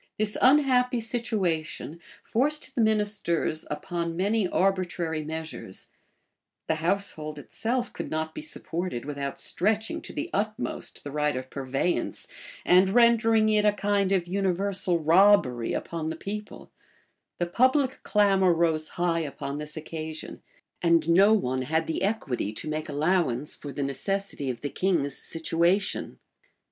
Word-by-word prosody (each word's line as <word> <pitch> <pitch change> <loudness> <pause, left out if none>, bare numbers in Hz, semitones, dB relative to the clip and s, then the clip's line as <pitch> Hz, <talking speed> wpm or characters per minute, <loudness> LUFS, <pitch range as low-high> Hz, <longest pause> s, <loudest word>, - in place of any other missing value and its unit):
This 215 0 -1
unhappy 255 -2 +4
situation 195 -9 -2 0.2
forced 285 +3 0
the 245 - +1
ministers 205 -7 0
upon 170 +1 -3
many 200 +2 +1
arbitrary 175 -4 0
measures: 160 -10 -5 0.7
the 160 - 0
household 165 -4 -1
itself 240 - -3
could - - -5
not 160 0 -2
be - - -6
supported 175 - -4
without 140 -1 -4
stretching 215 +4 0
to - - -7
the 310 +3 -4
utmost 215 +4 -3
the 145 - -6
right 150 -1 0
of 130 0 -7
purveyance, 135 +5 -2 0.4
and 185 +1 +5
rendering 225 0 +4
it 210 -1 +3
a 210 - +5
kind 205 -1 0
of 185 -3 +1
universal 190 -1 0
robbery 165 - +4
upon 160 -2 -3
the 160 - -3
people: 210 +5 -7 0.7
the 175 - 0
public 260 +8 +2
clamor 195 -4 +3
rose 160 -2 +1
high 175 -1 +1
upon 145 -2 -4
this 150 +1 -7
occasion, 155 0 -6 0.4
and 170 -1 +3
no 195 +5 +6
one 130 -12 +1
had 160 +5 0
the 160 - -2
equity 145 - -1
to 110 - -5
make 155 +1 -3
allowance 150 -3 0
for 145 - -8
the 140 - -3
necessity 145 +2 -2
of 120 -2 -4
the 145 - -3
king's 160 -8 0
situation. 170 +5 0
175 Hz, 135 wpm, -27 LUFS, 155-210 Hz, 0.7 s, no